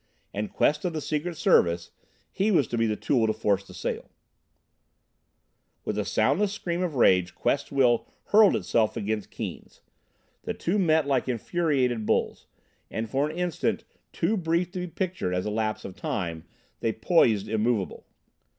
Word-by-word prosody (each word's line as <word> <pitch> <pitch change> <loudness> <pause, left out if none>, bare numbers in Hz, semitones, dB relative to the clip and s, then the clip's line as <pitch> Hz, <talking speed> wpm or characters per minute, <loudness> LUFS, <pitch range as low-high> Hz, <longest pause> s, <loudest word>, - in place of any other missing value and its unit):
And 105 +1 -3
Quest 150 - +2
of 180 -2 -1
the 155 - -2
Secret 155 +3 -3
Service 85 -8 +3 0.4
he 200 +3 +1
was 170 - +4
to - - -2
be 115 -1 +2
the 105 - 0
tool 115 0 +1
to 110 - +1
force 100 -3 0
the 95 - -12
sale. - - -4 1.8
With 105 - -2
the 105 -1 -1
soundless 190 - +2
scream 175 -4 -3
of 175 -5 -2
rage 90 -7 +4
Quest's 140 - -1
will 125 -4 +3 0.2
hurled 210 -1 +6
itself 110 -2 +1
against 105 0 -2
Keane's. - - -7 0.6
The - - -4
two 190 +5 0
met 160 -4 +3
like 135 -2 0
infuriated 125 -3 0
bulls, - - 0 0.4
and 115 0 -3
for 140 +6 0
an 160 - -7
instant 180 +5 -1 0.3
too 180 +6 0
brief 170 0 0
to 185 - -5
be 180 - -3
pictured 175 - -2
as 90 - -1
a 105 - -1
lapse 110 0 -2
of 95 - -7
time 90 - -3 0.3
they 115 - 0
poised 110 - +3
immovable. 110 -2 -1
130 Hz, 165 wpm, -26 LUFS, 105-170 Hz, 1.8 s, hurled